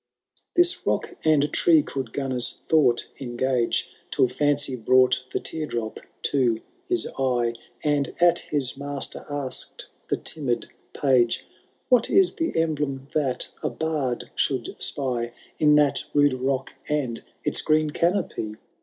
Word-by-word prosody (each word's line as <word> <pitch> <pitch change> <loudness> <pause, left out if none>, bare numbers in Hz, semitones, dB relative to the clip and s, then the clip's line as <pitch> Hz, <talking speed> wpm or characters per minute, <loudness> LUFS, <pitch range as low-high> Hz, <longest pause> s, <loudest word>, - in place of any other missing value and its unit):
This 350 0 +4
rock - - 0
and 150 -2 +3
tree 160 -3 +5
could 135 -3 -4
Gunnar^s 130 0 +1
thought 135 -7 +3
engage 125 -1 0 0.2
Till - - +3
Fancy 145 +1 +1
brought 125 +2 +3
the - - -1
tear 155 -1 -4
drop 115 -4 -4 0.2
to 120 -5 +2 0.3
his 360 -1 0
eye. 120 -3 +1 0.3
And 145 -2 0
at 175 0 +5
his 140 -4 -2
master 140 0 -4
ask^d 145 -3 -5 0.2
the - - 0
timid 135 -7 -3 0.3
Page, 125 -4 +2 0.4
What 250 -3 +4
is 385 -2 +4
the 330 - -2
emblem 145 -4 -1
that 135 -5 -1
a - - 0
bard 150 -6 -2
should 130 -5 -1
spy 120 -4 -1 0.3
In 150 -1 +5
that 145 -3 +3
rude 145 -1 +5
rock 130 +1 -1 0.2
and 135 -6 -1 0.2
its - - +2
green 155 0 +2
canopy 170 - -1
140 Hz, 135 wpm, -25 LUFS, 125-155 Hz, 0.4 s, tree